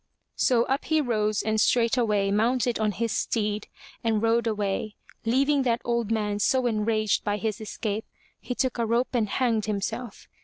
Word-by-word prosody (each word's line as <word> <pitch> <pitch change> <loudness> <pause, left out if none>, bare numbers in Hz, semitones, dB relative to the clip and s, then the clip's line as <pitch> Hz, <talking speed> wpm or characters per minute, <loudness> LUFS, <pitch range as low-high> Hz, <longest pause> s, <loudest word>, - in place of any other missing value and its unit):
'* - - -54
So 240 -2 +3
up 270 +3 -1
he 315 0 +2
rose 215 -6 0
and 220 0 +1
straightway 225 -4 +2
mounted 235 +3 +1
on 215 -1 +1
his 230 +3 -2
steed 210 -1 -1 0.4
and 225 -2 +1
rode 230 +1 +2
away, 210 -1 -2 0.3
leaving 275 +5 +3
that 240 -2 +1
old 235 -2 0
man 210 -2 0
so 255 +4 +2
enraged 215 -2 +1
by 205 -1 0
his 220 +1 -3
escape, 215 0 -3 0.3
he 250 - -5
took 255 -1 -1
a 230 - +2
rope 235 +4 0
and 225 -4 +1
hanged 230 -4 +1
himself. 215 +2 -4
225 Hz, 175 wpm, -26 LUFS, 210-240 Hz, 0.4 s, So